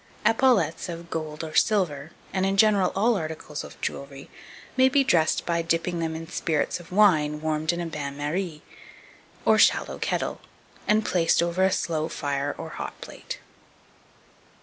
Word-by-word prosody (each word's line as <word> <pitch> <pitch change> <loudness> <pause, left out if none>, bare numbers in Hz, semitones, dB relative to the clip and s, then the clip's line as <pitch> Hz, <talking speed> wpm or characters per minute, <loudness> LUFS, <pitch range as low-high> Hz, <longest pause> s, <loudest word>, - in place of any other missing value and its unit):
2287. 225 - +6 0.4
Epaulettes - - -8
of 170 0 -7
gold 155 -1 -4
or 155 -1 -6
silver, 160 -10 +1 0.2
and, 190 - 0
in 195 +1 +1
general, 200 -3 +4
all 225 +4 +3
articles 155 -3 -5
of - - -12
jewellery, 140 0 -6 0.4
may 260 0 +5
be 275 +1 +4
dressed 160 -10 +2
by 170 -1 +1
dipping 165 +1 -1
them 160 -1 -2
in 165 0 -6
spirits 160 -2 -1
of 175 0 -14
wine 160 -7 +4
warmed 155 +1 0
in 170 - -4
a 175 - -2
bain 145 -3 -5
marie, 155 +2 -3 0.8
or - - +5
shallow - - +3
kettle, - - -2 0.6
placed 170 -3 +2
over 170 +2 0
a 190 - +4
slow 160 -3 -1
fire 145 -2 -2
or - - -6
hot - - -7
plate. - - -8
165 Hz, 160 wpm, -26 LUFS, 155-185 Hz, 0.8 s, 2287